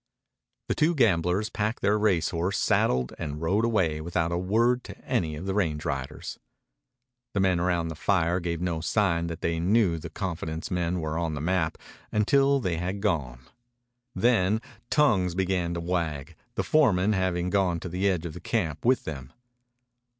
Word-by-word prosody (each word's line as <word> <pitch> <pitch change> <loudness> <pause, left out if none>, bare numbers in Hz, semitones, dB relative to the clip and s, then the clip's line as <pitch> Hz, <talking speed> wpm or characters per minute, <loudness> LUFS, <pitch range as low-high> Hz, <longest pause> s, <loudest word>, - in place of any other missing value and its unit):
The - - +1
two 165 +3 +2
gamblers 95 - +2
packed 110 +2 -2
their 100 +1 +3
race 105 -6 +2
horse, 90 +4 -1
saddled, 65 0 +1
and 75 0 -4
rode 95 +7 +1
away 90 -10 +1
without 85 0 -1
a 85 - 0
word 115 +7 +2
to - - -9
any 80 -3 0
of 80 +5 -7
the 95 - -1
range 80 -6 -1
riders. 70 -4 -4 1.0
The - - +2
men 95 -2 +2
round 85 -2 0
the - - -6
fire 90 0 +1
gave 85 -1 -3
no 85 -3 -1
sign 85 -3 +1
that 85 -1 -6
they 85 0 0
knew 90 -1 +2
the 80 - -7
confidence 80 -2 -4
men 90 0 0
were 80 +1 -2
on 80 -2 -2
the - - -4
map 80 0 0 0.3
until 135 +6 +3
after 135 - -4
they 85 -2 -1
had 90 +4 -3
gone. 75 - -1 0.7
Then 110 -3 +3 0.3
tongues 95 - +3
began 90 -2 0
to - - -2
wag, 85 -3 -2 0.2
the - - 0
foreman 110 -10 +3
having 90 -2 0
gone 95 -4 +1
to - - -5
the 95 +3 0
edge 90 -3 -1
of 80 - -5
the 90 - -8
camp 85 -11 -2
with 130 +2 +3
them. 70 -4 -7
90 Hz, 180 wpm, -27 LUFS, 80-100 Hz, 1.0 s, their